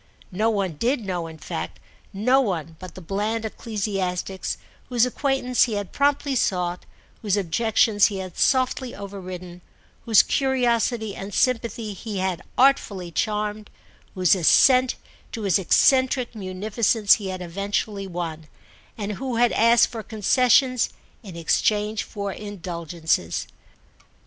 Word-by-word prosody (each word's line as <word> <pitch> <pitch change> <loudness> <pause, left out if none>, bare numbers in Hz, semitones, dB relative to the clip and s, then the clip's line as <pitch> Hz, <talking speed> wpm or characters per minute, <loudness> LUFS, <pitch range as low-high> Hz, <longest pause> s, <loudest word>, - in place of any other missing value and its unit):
No 215 +5 +1
one 195 -7 -1
did 240 - 0
know, 175 -3 -3
in 160 -1 -10
fact—no 215 - -2
one 165 - -3
but 185 -1 -10
the 185 - -9
bland 210 +5 -2
ecclesiastics 195 -4 -3 0.3
whose 245 -1 +3
acquaintance 255 -1 +1
he 235 - -4
had 205 -3 -4
promptly 285 0 +1
sought, 180 -6 -1 0.3
whose 205 -2 0
objections 205 +3 +3
he 200 - -5
had 185 -2 -7
softly 255 -1 +1
overridden, 185 -3 -8 0.4
whose 225 -3 +6
curiosity 240 -5 0
and 195 0 -7
sympathy 230 -3 0
he 205 +1 -6
had 185 -2 -1 0.2
artfully 205 -9 +2
charmed, 210 +2 -2 0.5
whose 185 -2 +4
assent 255 - +5 0.4
to 225 - -5
his 195 -2 +2
eccentric 260 - +3
munificence 210 +2 +1
he 195 - -4
had 185 -1 -5
eventually 200 +2 -3
won, 165 -3 -5 0.5
and 210 -1 -3
who 260 -3 -2
had 240 0 +3
asked 230 +1 +4
for 230 -2 -6
concessions 250 +4 +2 0.3
in 195 -6 -10
exchange 210 +6 +1
for 200 -1 -5
indulgences. 170 - -3
205 Hz, 125 wpm, -23 LUFS, 185-235 Hz, 0.5 s, whose